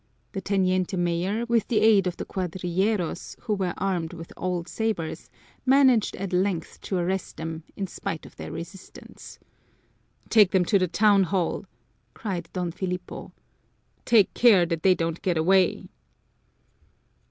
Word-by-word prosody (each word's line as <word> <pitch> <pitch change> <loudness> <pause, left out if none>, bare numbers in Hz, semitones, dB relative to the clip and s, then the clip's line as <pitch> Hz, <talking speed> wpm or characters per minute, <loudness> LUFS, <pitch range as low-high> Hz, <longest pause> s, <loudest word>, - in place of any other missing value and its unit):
The 195 - -4
teniente 185 -1 0
mayor, 175 +6 0
with 235 -2 +1
the 220 - +2
aid 210 -4 +5
of 175 - -3
the - - -5
cuadrilleros, 185 +1 -2
who 220 - -1
were 190 -3 -1
armed 180 -4 -2
with 165 -1 -9
old 180 -2 -3
sabers, 215 -8 -3 0.3
managed 260 -4 +4
at 195 -1 -5
length 180 -3 -1
to 190 - -2
arrest 180 +1 -2
them, 160 0 -5
in 195 - -3
spite 165 -3 -5
of - - -14
their - - -7
resistance. 180 +3 -10 0.9
"Take 210 -4 +6
them 185 -2 +2
to 200 - +3
the 185 - +1
town 200 +1 +4
hall!" 180 -1 -1 0.5
cried 180 -6 -4
Don 180 -2 -2
Filipo. 180 0 -5 0.7
"Take 220 -5 +4
care 210 -8 +5
that 165 -1 -2
they 185 +1 +5
don't 165 -1 -2
get 175 -3 0
away!" 185 +3 +2
185 Hz, 145 wpm, -25 LUFS, 175-200 Hz, 0.9 s, Take